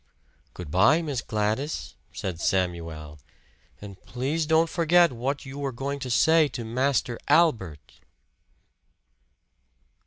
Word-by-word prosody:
"Good 90 -5 -8
by, 110 - +4
Miss 140 -6 -3
Gladys," 110 +7 -2 0.2
said 90 -3 -5
Samuel. 85 -5 -2 0.6
"And 100 -2 -11
please 145 +6 -2
don't 160 +1 +3
forget 170 +1 +3
what 130 +4 -3
you 135 +1 -8
were 140 -1 -2
going 140 +3 -4
to 130 - -6
say 160 +6 +4
to 120 -4 -7
Master 125 0 -1
Albert!" 110 - +1
125 Hz, 115 wpm, -25 LUFS, 95-150 Hz, 0.6 s, by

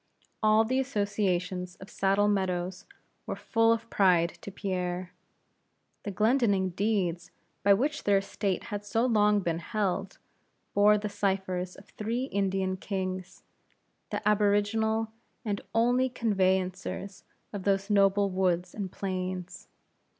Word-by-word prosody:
All 215 +1 +5
the 255 +4 0
associations 190 -7 -1
of 190 - -13
Saddle 195 +1 +2
Meadows 185 -2 -1 0.4
were - - -2
full 225 0 +2
of 230 0 0
pride 180 -4 +4
to - - -7
Pierre. 180 -2 -3 0.9
The 210 - -5
Glendinning 205 -2 +2
deeds 185 -3 -1 0.3
by 200 0 +6
which 295 +8 -1
their 200 -1 +4
estate 195 -1 -2
had 205 0 -3
so 225 +4 +1
long 210 -3 +3
been 170 -2 -1
held, 195 0 -2 0.6
bore 210 +1 +5
the 210 0 -3
cyphers 190 -3 -2
of 195 - -14
three 230 +4 -3
Indian 195 -5 -1
kings, 185 -2 -4 0.7
the - - -3
aboriginal 210 +2 +2 0.3
and 205 -2 -2
only 245 +3 +3
conveyancers 190 -3 -1 0.3
of 200 - -4
those 200 +1 0
noble 200 0 +4
woods 180 -1 0
and 195 -3 -4
plains. 185 -2 -4
200 Hz, 125 wpm, -29 LUFS, 185-210 Hz, 0.9 s, by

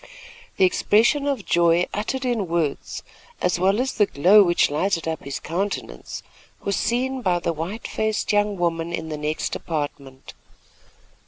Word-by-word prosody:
The 190 - +5
expression 235 +10 +3
of 280 -2 -1
joy 170 0 +3
uttered 255 +6 -2
in 230 -6 0
words, 165 -4 -2 0.4
as 180 -1 0
well 195 +4 +3
as 260 +1 0
the 210 - +3
glow 185 +9 +6
which 175 -5 +3
lighted 165 +2 0
up 160 -1 -3
his 140 0 -5
countenance, 195 +5 -4 0.4
was 200 - 0
seen 255 +3 -1
by 180 -5 +2
the 170 -1 -1
white 170 +8 -5
faced 220 0 -1
young 205 -1 +2
woman 170 -1 -1
in 160 -2 -4
the 155 - -4
next 150 +1 -2
apartment. 145 -4 -5
180 Hz, 155 wpm, -23 LUFS, 165-210 Hz, 0.4 s, glow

